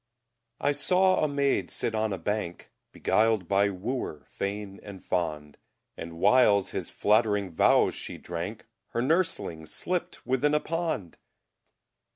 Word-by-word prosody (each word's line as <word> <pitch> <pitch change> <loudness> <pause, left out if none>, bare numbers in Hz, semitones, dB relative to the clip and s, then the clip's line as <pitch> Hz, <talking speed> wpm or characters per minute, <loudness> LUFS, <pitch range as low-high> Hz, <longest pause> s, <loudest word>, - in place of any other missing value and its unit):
I 145 - +2
sawe 185 +6 +3
a - - +3
Mayd 140 -1 0
sitte 115 - -2
on 110 -1 0
a 95 - -2
Bank, 90 0 -4 0.2
Beguiled 110 -4 +2
by 100 +2 +3
Wooer 100 - -4
fayne 100 0 -5
and 100 -2 -11
fond; 75 -5 -2 0.4
And 85 0 -7
whiles 100 0 +4
His - - -4
flatterynge 105 -3 +2
Vowes - - +4
She - - -6
drank, 90 +6 -6 0.3
Her 120 - 0
Nurselynge 125 - 0
slipt 180 - -4
within 135 +4 +2
a - - +4
Pond! 160 - -3
105 Hz, 135 wpm, -28 LUFS, 95-140 Hz, 0.4 s, whiles